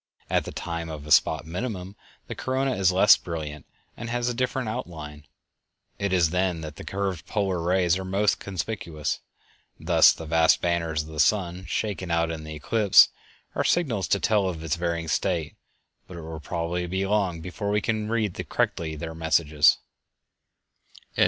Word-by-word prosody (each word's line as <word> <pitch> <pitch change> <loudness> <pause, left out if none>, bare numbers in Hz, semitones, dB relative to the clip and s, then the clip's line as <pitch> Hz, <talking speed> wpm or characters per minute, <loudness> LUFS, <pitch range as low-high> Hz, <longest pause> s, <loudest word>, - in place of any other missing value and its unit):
_ - - -34
At - - +2
the - - -6
time 85 -1 -5
of 75 -2 -7
a 75 - -8
spot 80 0 +4
minimum 95 +2 -5 0.3
the - - -6
corona 130 +1 -1
is 95 -1 +3
less 95 +3 +7
brilliant 75 -3 -6 0.3
and 115 +1 -6
has 120 0 -1
a - - -1
different 125 0 -1
outline. 75 -8 -6 0.7
It 100 -1 -1
is 85 -4 +3
then 90 -2 0
that 75 -1 -8
the - - -8
curved 95 -3 -3
polar 95 -5 -1
rays 90 0 +2
are - - -4
most 100 +3 +1
conspicuous. 90 -5 -4 0.6
Thus - - +6
the 80 - -7
vast 80 +1 +4
banners 85 -3 0
of 75 - -12
the 80 -1 -7
sun, 95 0 +1
shaken 95 -3 -3
out 85 0 +1
in 80 -1 -6
the 80 0 -7
eclipse, 100 +7 +5 0.4
are - - 0
signals 125 - +1
to 100 - +2
tell 105 -3 +2
of 80 -3 -6
its 80 -3 0
varying 85 -1 -2
state, 85 -1 -1 0.5
but 90 - -9
it - - -7
will 80 0 -7
probably 85 +3 -3
be 95 +2 -1
long 95 -4 0
before 90 +5 -5
we 105 +1 +2
can 110 -1 -2
read 110 -4 0 0.2
correctly 80 -2 -1
their 80 +1 -6
messages. 80 -2 +3
90 Hz, 175 wpm, -25 LUFS, 80-100 Hz, 0.7 s, less